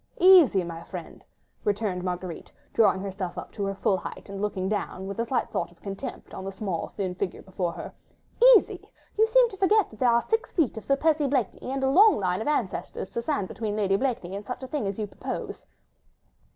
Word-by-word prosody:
"Easy, 345 - +7
my 165 -1 -6
friend," - - -9 0.4
retorted 205 -3 -1
Marguerite, 180 -1 -5 0.2
drawing 205 -4 +4
herself 190 -2 -5
up - - -7
to 205 - -4
her 195 0 -2
full 195 0 +1
height - - -8
and 200 0 -6
looking 195 -3 -1
down, 190 -2 -3
with 200 +3 -6
a 230 - +1
slight 245 0 -1
thought - - -2
of 170 - -22
contempt 200 +8 -7
on - - -6
the 195 - -4
small, 190 -3 -3
thin 190 -3 -1
figure 180 0 -4
before 185 -2 -2
her. - - -8 0.6
"Easy! - - -4 0.3
you 440 +1 +4
seem - - +5
to 390 - -9
forget 405 +1 +3
that 215 - -14
there 250 - +4
are 235 0 +3
six 450 +2 -1
feet 320 -9 +1
of 220 - -8
Sir 275 - +3
Percy 305 0 +2
Blakeney, 255 -3 -1
and 270 0 -2
a - - +3
long 400 +10 +6
line 185 0 0
of - - -4
ancestors 230 -9 -2
to 235 - -2
stand 255 -7 -1
between 215 0 -4
Lady 195 -2 +2
Blakeney 200 -6 -2
and 200 - -5
such 250 +4 -6
a - - -5
thing 270 -7 -2
as 195 - -3
you 215 - -2
propose." 205 - -6
210 Hz, 215 wpm, -26 LUFS, 190-275 Hz, 0.6 s, Easy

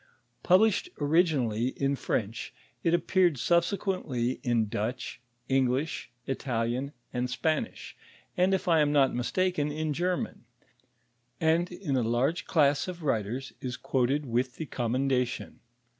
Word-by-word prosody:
Published 210 - +4
originally 145 -8 +2
in 140 0 +1
French, 110 -4 -3 0.3
it 165 0 +3
appeared 175 -2 +2
subsequently 170 - 0
in 120 -4 +1
Dutch, 115 +5 -4 0.3
English, 135 +2 0 0.2
Italian, 125 0 -2 0.2
and 125 0 -1
Spanish, 155 - -2 0.4
and 185 0 +3
if 190 - -3
1 165 -3 +4
am 150 -1 +3
not 140 -2 +4
mistaken 150 +4 0
in 155 0 -2
German; 180 - -2 0.9
and 165 +2 +2
in 175 -6 -3
a 130 - +2
large 120 +8 0
class 145 -1 +3
of 175 -2 -6
writers 120 0 -1
is 125 -1 -4
quoted 135 +4 0
with 125 +1 -1
the 160 - -5
coramendatiou. 125 0 -1
140 Hz, 125 wpm, -29 LUFS, 125-170 Hz, 0.9 s, Published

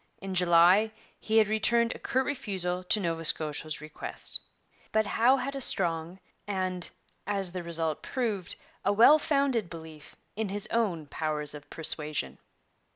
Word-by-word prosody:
In 195 -1 -6
July 180 +4 +5 0.3
he 220 +1 0
had 220 -2 +6
returned 230 +2 +2
a - - -11
curt 260 +1 0
refusal 190 -10 -3
to 210 - +2
Nova 165 -3 -2
Scotia's 155 -1 -1
request. 155 0 -1 0.5
But 220 0 +2
Howe 240 +6 +4
had 275 +2 -4
a 275 - -4
strong 170 -4 +1 0.3
and, 185 -3 -2 0.4
as 195 -3 -1
the 180 0 -4
result 165 -2 -1
proved, 215 -9 -2 0.3
a 200 - +2
well 240 +9 +7
founded 275 - +1
belief 160 -2 -11 0.2
in 215 -1 -2
his 205 +1 -2
own 195 -9 0
powers 150 0 -3
of 145 -1 -11
persuasion. 155 -2 -2
185 Hz, 150 wpm, -29 LUFS, 165-220 Hz, 0.5 s, well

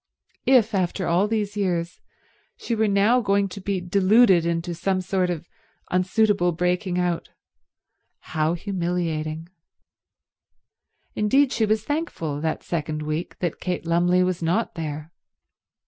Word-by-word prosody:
If, 240 -4 +4
after 185 -1 -1
all 175 +5 +2
these 210 -2 -2
years, 180 -3 -2 0.6
she 235 - -4
were 220 -1 +2
now 205 +5 +3
going 200 -2 +2
to 200 +2 -8
be 195 0 -1
deluded 185 0 +4
into 170 +1 -2
some 185 +3 -1
sort 185 0 0
of 170 -1 -4 0.4
unsuitable 185 0 +2
breaking 180 +1 -1
out, 175 -2 -1 0.9
how 155 +2 -1
humiliating. 170 -4 -3 1.7
Indeed 265 +6 +3
she 220 - +1
was 215 0 +1
thankful, 220 - -3
that 160 0 -2
second 155 -2 -3
week, 155 +3 -4
that 175 -3 -2
Kate 180 -2 -3
Lumley 175 +2 +3
was 180 -1 -1
not 175 +8 0
there. 155 -1 -5
180 Hz, 130 wpm, -24 LUFS, 170-200 Hz, 1.7 s, If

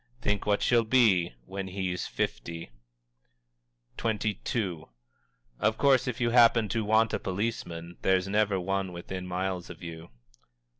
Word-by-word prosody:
Think 105 -4 -1
what 105 0 +2
she'll 120 -1 +4
be, 110 - +3
when 95 +4 -5
he's 90 -2 -3
fifty!_" 80 +4 -4 1.3
XXII. 105 - -1 0.8
"_Of 110 +1 +2
course 135 -2 +4
if 125 - -3
you 120 -1 +1
happen 115 -2 +6
to 110 +3 0
want 110 +1 +3
a - - 0
policeman, 90 -4 -4
there's 95 0 +2
never 105 -1 +2
one 95 0 -2
within 90 +1 -6
miles 90 0 -3
of 90 -1 -10
you. 85 0 -8
95 Hz, 135 wpm, -28 LUFS, 90-110 Hz, 1.3 s, happen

